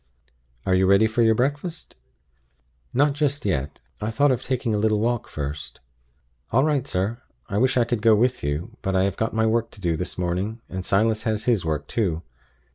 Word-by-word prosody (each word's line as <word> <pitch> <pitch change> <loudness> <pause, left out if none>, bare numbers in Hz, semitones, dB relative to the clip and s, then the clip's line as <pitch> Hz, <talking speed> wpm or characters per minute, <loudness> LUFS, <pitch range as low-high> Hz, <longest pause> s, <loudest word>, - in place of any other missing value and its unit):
Are 95 - +2
you 95 0 +4
ready 100 +3 +5
for 110 +2 +1
your 110 -1 +5
breakfast?" 145 +8 -2 1.0
"Not 145 +3 +3
just 145 -2 -1
yet. 75 -7 -2 0.2
I 105 - -1
thought 140 +5 +3
of 125 - 0
taking 125 -3 -1
a 105 - +1
little 105 0 +2
walk 120 +1 0
first." 70 -3 -6 0.7
"All 130 +4 +4
right, 145 -3 +1
sir. 105 +4 -2 0.3
I 100 0 0
wish 130 +2 +2
I 120 - +5
could 120 -2 -1
go 110 -1 +6
with 125 +4 +1
you; 75 +3 -3
but 95 0 -1
I 95 - +3
have 100 -1 0
got 110 +1 -2
my 110 0 +2
work 115 +1 +1
to - - -15
do 85 -3 +1
this 90 +4 -4
morning, 90 +5 -2
and 95 0 -5
Silas 110 +3 +2
has 110 0 -1
his 115 -7 +2
work 75 -3 -2
too. 85 -4 -1
110 Hz, 200 wpm, -24 LUFS, 95-120 Hz, 1.0 s, go